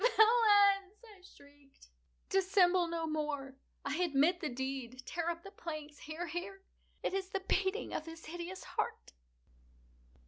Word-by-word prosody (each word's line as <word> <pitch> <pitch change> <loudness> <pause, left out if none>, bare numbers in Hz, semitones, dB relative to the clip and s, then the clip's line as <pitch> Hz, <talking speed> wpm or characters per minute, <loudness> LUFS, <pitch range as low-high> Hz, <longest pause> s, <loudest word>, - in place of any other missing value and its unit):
"Villains!" 415 -4 +5
I 415 -4 -15
shrieked, 285 - -19 0.4
"dissemble 370 -2 +4
no 335 -1 -2
more! 295 -4 -3 0.3
I 285 +2 -1
admit 345 0 +3
the 310 - -2
deed!—tear 265 +5 -4
up 340 0 -4
the 395 - -10
planks!—here, 310 0 -6
here!—It 375 +4 -7
is 385 -1 -2
the 390 -1 -2
beating 390 +3 0
of 315 - -3
his 325 0 -9
hideous 350 +3 -6
heart!" - - -4
345 Hz, 125 wpm, -34 LUFS, 300-390 Hz, 0.4 s, Villains